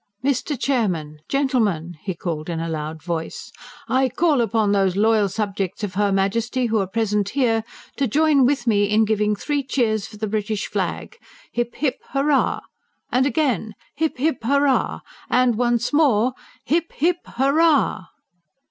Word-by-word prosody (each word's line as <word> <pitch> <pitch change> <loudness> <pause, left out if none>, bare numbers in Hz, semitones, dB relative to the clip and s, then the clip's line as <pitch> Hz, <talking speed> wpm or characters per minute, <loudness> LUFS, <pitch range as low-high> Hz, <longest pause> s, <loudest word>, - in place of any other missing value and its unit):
"Mr. 280 0 0
Chairman! 180 - -1
Gentlemen!" 220 - 0
he 190 -3 -4
cried 160 -2 -4
in 165 -1 -2
a 165 - -3
loud 155 0 -5
voice. 165 -2 -5 0.4
"I 260 0 +2
call 300 0 +2
upon 220 -2 +1
those 195 -2 +2
loyal 215 0 +3
subjects 200 -1 -3
of 205 -2 -3
her 205 +1 +1
Majesty 230 +6 0
who 225 -2 +1
are 195 - -1
present 210 -1 0
here, 225 -3 +1 0.3
to 275 - +1
join 295 +2 +3
with 265 -3 0
me 205 -3 +3
in 215 +2 +3
giving 210 -1 +1
three 290 +7 -1
cheers 220 -6 0
for 215 - -13
the 215 - -2
British 210 0 -2
flag. 465 - -4 0.3
Hip, 240 0 -2
hip, 275 -2 -1
hurrah! 275 0 +2 0.5
And, 260 +2 +3
again, 240 - 0 0.2
hip, 315 -1 -1
hip, 285 0 +1
hurrah! 280 +3 +1 0.3
And, 250 -2 +3
once 240 +2 0
more, 255 -6 +3 0.3
hip, 335 +3 0
hip, 345 +4 +1
hurrah!" 280 - +2
225 Hz, 155 wpm, -22 LUFS, 200-275 Hz, 0.5 s, loyal